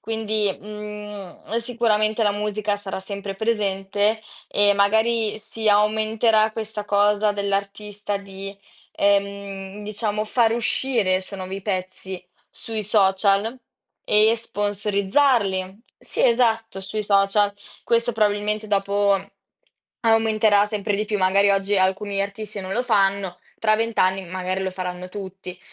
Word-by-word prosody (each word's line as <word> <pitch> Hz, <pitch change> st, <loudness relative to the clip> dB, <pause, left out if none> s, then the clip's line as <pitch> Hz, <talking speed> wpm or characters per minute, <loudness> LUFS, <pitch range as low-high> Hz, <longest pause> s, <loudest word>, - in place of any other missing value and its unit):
Quindi, 215 Hz, -2 st, -1 dB
mhmm, 210 Hz, -1 st, -7 dB
sicuramente 225 Hz, -2 st, +1 dB
la 205 Hz, -1 st, +3 dB
musica 210 Hz, 0 st, -1 dB
sarà 200 Hz, -2 st, -5 dB
sempre 200 Hz, 0 st, -6 dB
presente 205 Hz, 0 st, 0 dB, 0.3 s
e 205 Hz, 0 st, +4 dB
magari 220 Hz, +2 st, +2 dB
si 220 Hz, +1 st, -3 dB
aumenterà 215 Hz, +1 st, +3 dB
questa 220 Hz, -1 st, -5 dB
cosa 205 Hz, +1 st, +2 dB
dell'artista 200 Hz, +1 st, -3 dB
di, 195 Hz, 0 st, -8 dB, 0.4 s
ehm, 200 Hz, 0 st, -1 dB
diciamo 210 Hz, 0 st, -2 dB
far 225 Hz, 0 st, +2 dB
uscire 230 Hz, -4 st, +1 dB
i -, -, -2 dB
suoi 190 Hz, +1 st, -9 dB
nuovi 190 Hz, +1 st, -5 dB
pezzi 185 Hz, -1 st, -4 dB, 0.3 s
sui 220 Hz, -1 st, -5 dB
social 200 Hz, +3 st, +2 dB, 0.5 s
e 215 Hz, +2 st, +5 dB
sponsorizzarli. 205 Hz, -1 st, 0 dB, 0.2 s
Sì, -, -, -3 dB
esatto, 225 Hz, -4 st, +2 dB
sui 210 Hz, +3 st, -4 dB
social. 200 Hz, 0 st, +3 dB, 0.3 s
Questo 235 Hz, 0 st, +1 dB
probabilmente 210 Hz, 0 st, 0 dB
dopo, 200 Hz, 0 st, +2 dB, 0.8 s
aumenterà 220 Hz, -2 st, +3 dB
sempre 205 Hz, -1 st, -2 dB
di 210 Hz, -, 0 dB
più. 210 Hz, 0 st, -1 dB
Magari 195 Hz, +2 st, +4 dB
oggi 195 Hz, 0 st, +2 dB
alcuni 195 Hz, +1 st, 0 dB
artisti 200 Hz, +1 st, -5 dB
non 190 Hz, 0 st, -5 dB
lo 240 Hz, -, 0 dB
fanno. 195 Hz, -5 st, +1 dB, 0.2 s
Tra 215 Hz, -1 st, +3 dB
20 230 Hz, 0 st, -2 dB
anni 185 Hz, +1 st, +2 dB
magari 185 Hz, +1 st, -2 dB
lo 190 Hz, -, -1 dB
faranno 180 Hz, 0 st, -5 dB
tutti. 190 Hz, -2 st, -8 dB
205 Hz, 125 wpm, -23 LUFS, 195-215 Hz, 0.8 s, e